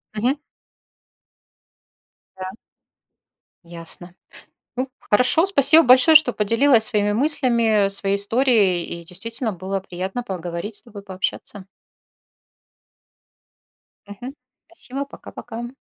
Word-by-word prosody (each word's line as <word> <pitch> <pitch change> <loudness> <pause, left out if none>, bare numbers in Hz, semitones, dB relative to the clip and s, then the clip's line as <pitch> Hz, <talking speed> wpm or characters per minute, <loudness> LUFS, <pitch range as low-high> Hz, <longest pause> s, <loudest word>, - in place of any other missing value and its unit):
Мгм. 250 +7 -1 2.0
Да. 185 0 -6 1.2
Ясно. 170 +1 -10 0.6
Ну, 255 +2 -2
хорошо, 250 - +2
спасибо 315 -3 +5
большое, 255 +6 +6
что 305 -6 +7
поделилась 230 +3 +2
своими 205 -1 0
мыслями, 235 -6 +2
своей 195 0 +1
историей, 205 -4 +2
и 170 0 -8
действительно 230 +6 -4
было 190 +2 -4
приятно 190 +5 -6
поговорить 180 0 -6
с - - -3
тобой, 205 -4 -12
пообщаться. 190 +1 -5 2.4
Мгм. 240 +7 -9 0.3
Спасибо. 280 -4 -7
Пока-пока. 240 -3 -9
220 Hz, 90 wpm, -21 LUFS, 190-255 Hz, 2.4 s, что